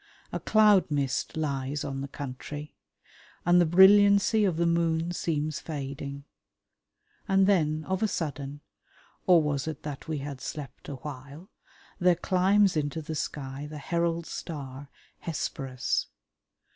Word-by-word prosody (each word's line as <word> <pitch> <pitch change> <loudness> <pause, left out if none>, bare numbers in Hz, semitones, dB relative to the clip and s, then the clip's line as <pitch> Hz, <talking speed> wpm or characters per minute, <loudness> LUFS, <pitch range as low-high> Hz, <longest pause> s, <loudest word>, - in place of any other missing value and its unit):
A - - -2
cloud 210 -5 +4
mist 140 0 -1
lies 140 -2 -2
on 135 -1 -4
the 140 - -4
country, 145 +2 -7 0.7
and 175 +1 +6
the 175 - +3
brilliancy 200 +4 +6
of 180 -5 0
the 170 - +2
moon 170 0 +1
seems 155 -3 -2
fading. 140 -2 -6 1.0
And 195 -1 +4
then 155 -6 +2
of 190 +3 -2
a 220 - +3
sudden 145 -5 -4 0.7
or 175 -3 +6
was 145 -1 -1
it 155 -3 -5
that 145 -2 -6
we 155 -1 -2
had 140 -1 -6
slept 145 -4 -7
awhile? 145 - -8 0.5
there 180 0 +4
climbs 190 +2 +3
into 155 +1 -2
the 160 - -5
sky 140 -1 -4
the 155 - -7
herald 170 +2 -1
star, 140 -4 -7 0.3
Hesperus. 135 -5 -2
155 Hz, 135 wpm, -28 LUFS, 140-175 Hz, 1.0 s, and